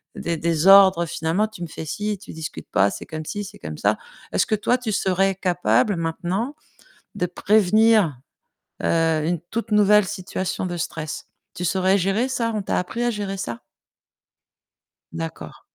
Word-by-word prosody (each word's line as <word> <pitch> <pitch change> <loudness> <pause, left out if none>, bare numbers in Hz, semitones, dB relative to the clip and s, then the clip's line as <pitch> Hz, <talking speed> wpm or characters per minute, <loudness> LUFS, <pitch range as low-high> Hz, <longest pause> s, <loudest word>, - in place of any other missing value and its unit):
des 170 -1 -2
des 165 +1 0
ordres, 190 -3 +7
finalement: 165 +7 0
«Tu 215 -5 -9
me - - -4
fais 160 - -7
si, 210 +6 -3
tu - - -11
discutes 160 -1 -7
pas, 100 +1 +3
c'est - - -7
comme 155 0 -6
ci, 205 +5 -4
c'est - - -11
comme 75 0 -7
ça». - - +2 0.4
Est-ce - - +3
que - - -1
toi, 230 +4 +1
tu 245 -3 -4
serais 195 0 +2
capable, 185 +2 +1
maintenant, 180 - -2 0.6
de 180 - 0
prévenir, 210 - +3 0.6
heu, 165 -2 +2
une 170 -1 -1
toute 230 0 -3
nouvelle 210 0 +5
situation 185 -1 -3
de 175 -1 -4
stress? 160 -2 -5 0.3
Tu 180 - -5
saurais 190 +2 +2
gérer 195 +7 +1
ça? 240 -3 -1
On 210 - -2
t'a - - -1
appris 225 +7 -3
à 240 - +2
gérer 205 -3 -4
ça? 120 -9 -5 1.5
D'accord. 80 0 -7
190 Hz, 170 wpm, -23 LUFS, 165-210 Hz, 1.5 s, ordres